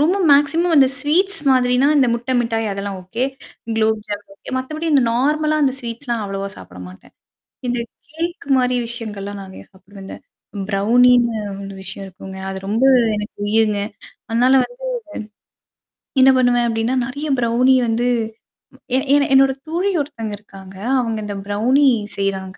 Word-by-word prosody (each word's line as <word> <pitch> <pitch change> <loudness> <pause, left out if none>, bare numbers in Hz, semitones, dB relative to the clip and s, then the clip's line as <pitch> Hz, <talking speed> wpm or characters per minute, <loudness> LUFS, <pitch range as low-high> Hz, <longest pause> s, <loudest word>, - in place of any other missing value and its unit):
ரொம்ப 330 +6 +3
ம் - - +2
மேக்ஸிமம் 320 +4 +3
அந்த 275 -2 +7
ஸ்வீட்ஸ் 355 +8 +2
மாதிரினா, 250 0 +3
இந்த 270 - +4
முட்டை 240 +2 -3
மிட்டாய், 225 -1 -1
அதெல்லாம் 200 0 -5
ஓகே, 225 +8 -3 0.5
க்ளோப் 220 0 +1
ஜாமுன் 205 -1 -6
ஓகே. - - -11
மத்தபடி 310 +5 -4
இந்த 275 -3 +5
நார்மலா 305 +5 +1
அ - - -8
ஸ்வீட்ஸ்லாம் 235 -1 -4
அவ்வளவா 195 0 -4
சாப்பிட 90 0 -12
மாட்டேன். 90 - -16 0.6
இந்த 245 0 -1 0.3
கேக் 335 +2 -5
மாரி 250 -1 +1
விஷயங்கள்லாம் 205 -4 -6
நிறையா 190 0 -12
சாப்பிடுவேன்ங்க. 195 0 -12 0.5
பிரவுனினு 235 +3 +4 0.3
ஒரு 195 - -8
விஷயம் 195 +1 -7
இருக்குங்க. 190 +1 -10
அது 190 - -5
ரொம்ப 225 +5 0 0.3
எனக்கு 210 +1 -6
உயிர்ங்க. 215 -1 +2 0.5
அதனால 245 +3 +3
வந்து - - -10 1.4
என்னா 265 +1 +7
பண்ணுவேன் 245 -1 +3
அப்டின்னா 225 +2 0
நெறைய 285 +4 -5
ப்ரௌணி 245 +2 +3
வந்து 230 +2 0 0.9
ஏ - - +4 0.2
ஏன்னா, 285 0 +4
என்னோட 270 0 +6 0.2
தோழி 350 +5 0
ஒருத்தங்க 225 -7 -6
இருக்காங்க. 195 -2 -14 0.3
அவுங்க 225 -2 -2
இந்த 205 -1 -5
பிரவுனி 230 +8 +2 0.3
செய்றாங்க. 195 -1 -3
235 Hz, 145 wpm, -19 LUFS, 205-265 Hz, 1.4 s, அந்த